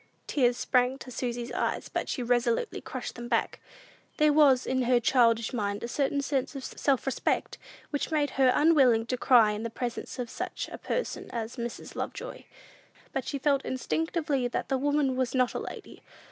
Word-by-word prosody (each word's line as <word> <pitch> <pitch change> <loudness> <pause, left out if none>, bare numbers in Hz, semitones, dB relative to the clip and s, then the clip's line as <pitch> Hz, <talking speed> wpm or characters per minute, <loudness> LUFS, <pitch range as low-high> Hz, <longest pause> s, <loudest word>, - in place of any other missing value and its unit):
Tears 245 -4 +2
sprang 250 +1 +2
to 260 - -10
Susy's 240 0 -3
eyes, - - -1
but - - -3
she 250 - -2
resolutely 240 - 0
crushed - - -6
them 240 0 -7
back. 230 -1 0 0.6
There 305 -1 +4
was, 275 -4 +5
in 260 0 0
her 245 0 +4
childish 230 -1 +3
mind, 205 -3 -2
a - - -2
certain 280 +2 0
sense 275 0 -1
of 270 - -6
self 270 -1 0
respect, 270 - -1 0.3
which 290 - -1
made 295 -3 +1
her 260 -1 +4
unwilling 270 -8 +5
to 255 - -1
cry 235 -4 +5
in 210 0 -4
the 230 - -3
presence 240 +3 -5
of 250 -2 -3
such 355 +10 -5
a - - -7
person - - -3
as 230 -1 -4
Mrs. 235 0 -6
Lovejoy. - - -6 0.8
She 285 - -4
felt 275 0 +1
instinctively 300 0 -1
that 245 - -3
the 265 - +1
woman 285 -1 +1
was 255 0 -1
not 255 -1 +2
a - - -2
lady. - - -9
255 Hz, 180 wpm, -28 LUFS, 240-280 Hz, 0.8 s, was